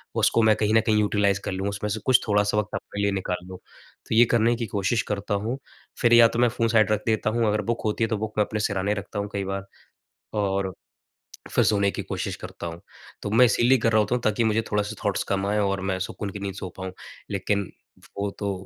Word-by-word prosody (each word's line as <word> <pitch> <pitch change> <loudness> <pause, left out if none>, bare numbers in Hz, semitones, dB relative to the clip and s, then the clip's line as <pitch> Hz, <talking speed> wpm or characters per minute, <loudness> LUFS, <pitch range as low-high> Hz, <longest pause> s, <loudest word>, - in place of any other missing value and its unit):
उसको 115 - +3
मैं 110 -1 +5
कहीं 110 0 0
न 115 - +6
कहीं 110 -1 +3
यूटिलाइज़ 100 -1 +2
कर - - -2
लूँ, 95 +1 -2
उसमें 100 +1 -3
से 110 +2 -2
कुछ 130 -2 +5
थोड़ा-सा 105 0 +2
वक़्त 105 -1 -1
अपने 100 - -5
लिए 100 0 +2
निकाल 90 -2 -3
लूँ। 95 0 -8
तो 110 - -9
ये 120 +2 +7
करने 120 +1 +3
की 115 0 -3
कोशिश 100 +3 0
करता 105 +1 -2
हूँ। 120 +4 -2 0.4
फिर 120 0 +4
या 120 -1 +9
तो 115 - -3
मैं 120 0 +4
फ़ोन 115 0 0
साइड 110 -3 +3
रख 105 -1 +1
देता 110 -1 +1
हूँ 115 0 +1
अगर 105 0 +1
बुक 115 +3 -2
होती 110 +1 0
है - - +2
तो 110 - -1
बुक 110 +1 -4
मैं 105 - +4
अपने 105 - -4
सिरहाने 100 -1 0
रखता 105 0 -5
हूँ 100 0 -3
कई 100 - -1
बार। 95 0 -4 0.7
और, 100 -2 0 0.8
फिर - - +4
सोने 100 -1 +3
की - - -5
कोशिश - - -4
करता - - -8
हूँ। 85 0 -7 0.4
तो 105 - -3
मैं 115 +4 +6
इसीलिए 120 +3 +4
कर 115 0 +1
रहा 110 - +4
होता 105 +3 0
हूँ 125 - -1
ताकि 110 +1 +1
मुझे 110 0 +2
थोड़ा-सा 105 -1 -1
थॉट्स 100 -1 +1
कम 100 0 0
आएँ 105 +1 +1
और 100 -1 0
मैं 95 - -1
सुकून 100 - -5
की 100 - -7
नींद 100 -1 -4
सो 95 -1 -6
पाऊँ। 95 -1 -6 0.4
लेकिन 100 0 -1 0.5
वो 100 0 -1
तो 100 -1 -1
105 Hz, 245 wpm, -25 LUFS, 100-110 Hz, 0.8 s, या